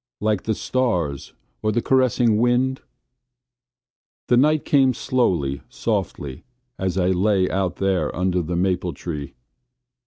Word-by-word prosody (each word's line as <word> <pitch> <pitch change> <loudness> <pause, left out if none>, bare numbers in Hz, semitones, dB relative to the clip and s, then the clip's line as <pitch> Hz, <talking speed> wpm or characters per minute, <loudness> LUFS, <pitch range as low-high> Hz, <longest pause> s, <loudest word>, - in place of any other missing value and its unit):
Like 105 -2 0
the 110 - 0
stars 90 - -1 0.3
or 110 - +1
the 115 - +1
caressing 125 -3 +2
wind? 125 +3 +1 1.5
The 125 - +5
night 150 +3 +3
came 135 -3 +3
slowly, 90 - 0
softly, 65 -3 -3 0.4
as 95 -1 -1
I 90 -1 +2
lay 95 0 +2
out 95 -1 -1
there 95 -1 0
under 90 0 0
the 85 +1 -3
maple 90 -1 0
tree. 75 -5 -6
95 Hz, 125 wpm, -22 LUFS, 90-125 Hz, 1.5 s, The